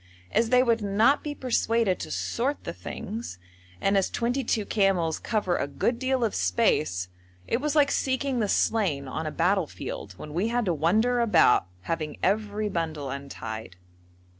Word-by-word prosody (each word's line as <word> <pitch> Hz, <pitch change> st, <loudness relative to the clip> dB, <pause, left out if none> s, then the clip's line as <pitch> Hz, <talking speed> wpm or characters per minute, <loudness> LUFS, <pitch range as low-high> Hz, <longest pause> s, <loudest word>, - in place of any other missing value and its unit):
As 230 Hz, 0 st, +2 dB
they 250 Hz, +1 st, +5 dB
would 230 Hz, -2 st, +2 dB
not 215 Hz, +8 st, +3 dB
be 295 Hz, -1 st, -4 dB
persuaded 230 Hz, -6 st, +1 dB
to -, -, -5 dB
sort 270 Hz, +5 st, -2 dB
the -, -, -5 dB
things, 220 Hz, -, -6 dB, 0.4 s
and 195 Hz, +1 st, +2 dB
as 195 Hz, -1 st, +2 dB
twenty 245 Hz, +3 st, -1 dB
two 220 Hz, -3 st, 0 dB
camels 190 Hz, -7 st, +1 dB
cover 205 Hz, -6 st, 0 dB
a 140 Hz, -, -1 dB
good 235 Hz, -, -1 dB
deal 260 Hz, -1 st, 0 dB
of 225 Hz, -, 0 dB
space, 90 Hz, 0 st, +1 dB, 0.4 s
it 235 Hz, -, -1 dB
was 300 Hz, +1 st, -1 dB
like 290 Hz, -2 st, +4 dB
seeking 260 Hz, -1 st, 0 dB
the 210 Hz, -3 st, 0 dB
slain 175 Hz, -15 st, +1 dB
on 155 Hz, +4 st, -4 dB
a -, -, -3 dB
battlefield 170 Hz, -, -1 dB
when 150 Hz, -, -8 dB
we 185 Hz, +7 st, 0 dB
had 240 Hz, 0 st, 0 dB
to 180 Hz, -, +1 dB
wander 215 Hz, +11 st, +2 dB
about 185 Hz, -, +4 dB
having 155 Hz, -, -3 dB
every 210 Hz, +1 st, 0 dB
bundle 160 Hz, -7 st, -3 dB
untied. 115 Hz, -7 st, -6 dB
205 Hz, 165 wpm, -27 LUFS, 160-235 Hz, 0.4 s, they